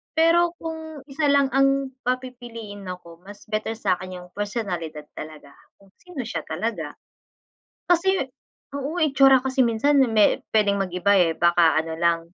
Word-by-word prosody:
Pero 335 +2 +3
kung 320 -3 -7
isa 290 +2 -1
lang 280 -1 +3
ang 275 0 +2
papipiliin 240 -5 -5
ako 170 -2 -9
mas 205 +1 -12
better 215 +1 -2
sa'kin 185 -3 -2
yung 180 0 -13
personalidad 180 -8 -4
talaga, 150 -2 -10 0.3
kung 195 -1 -23
sino 345 -8 -7
siya 240 - -4
talaga. - - -4 1.0
Kasi 380 +2 +3 0.6
oo, 290 +5 -4
itsura 270 -3 +5
kasi 265 0 +1
minsan 245 +6 +2
me 215 -2 +3
pwedeng 205 -2 +3
mag-iba, 185 +1 0
eh. 165 -3 +3
Baka 170 -2 +4
ano 160 0 -6
lang, 170 0 +2
225 Hz, 140 wpm, -23 LUFS, 180-275 Hz, 1.0 s, itsura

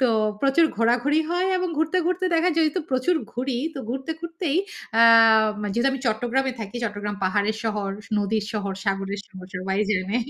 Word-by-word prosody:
তো 255 - +4 0.3
প্রচুর 275 +4 +4
ঘোরাঘুরি 245 +7 +2
হয় 360 +2 +1
এবং 365 0 -1
ঘুরতে, 320 +3 +1
ঘুরতে 365 +1 0
দেখা 335 +2 +3
যেহেতু 320 +2 +2
প্রচুর 260 +7 +1 0.2
ঘুরি 250 0 -2 0.2
তো - - -6
ঘুরতে 265 +4 -4
ঘুরতেই 335 -2 -2 0.4
অ্যাম 225 -1 +6 0.2
যেহেতু 235 +6 +2
আমি 270 - -4
চট্টগ্রামে 245 +4 0
থাকি, 210 +2 -6
চট্টগ্রাম 205 -1 -4
পাহাড়ের 205 +3 +1
শহর, 210 -3 -1 0.2
স - - -19
নদীর 210 +1 0
শহর, 200 -2 -2
সাগরের 195 0 -2
শহর। 185 -2 -11
সবাই 190 +2 -2
জানে 195 +2 0
230 Hz, 170 wpm, -24 LUFS, 205-290 Hz, 0.4 s, অ্যাম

